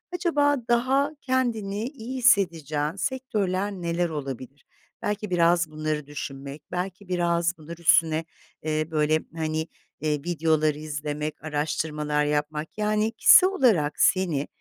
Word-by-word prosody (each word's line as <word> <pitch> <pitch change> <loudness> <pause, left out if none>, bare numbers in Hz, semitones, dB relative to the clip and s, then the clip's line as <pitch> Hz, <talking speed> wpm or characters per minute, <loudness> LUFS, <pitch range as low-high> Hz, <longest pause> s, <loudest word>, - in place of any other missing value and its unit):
Acaba 295 -5 +2
daha 265 +5 +2
kendini 225 -6 -1
iyi 260 -2 -7
hissedeceğin 165 - +2
sektörler 205 -3 -1
neler 175 -2 -1
olabilir? 135 -2 -7 0.4
Belki 210 0 -2
biraz 170 -2 +3
bunları 155 -1 -3
düşünmek, 140 0 -7
belki 180 +2 -4
biraz 170 -1 0
bunlar 165 +2 -9
üstüne, 165 -1 +3 0.4
eee, 155 0 -1
böyle, 155 0 +2 0.2
hani, 160 0 -2 0.3
eee, 150 -1 0
videolar 155 -2 +1
izlemek, 150 0 -5
araştırmalar 150 0 -1
yapmak. 150 +3 -2
Yani, 215 +1 +1
kişisel 370 +10 +7
olarak 215 - +2
seni, 170 -7 +2
165 Hz, 115 wpm, -25 LUFS, 150-205 Hz, 0.4 s, kişisel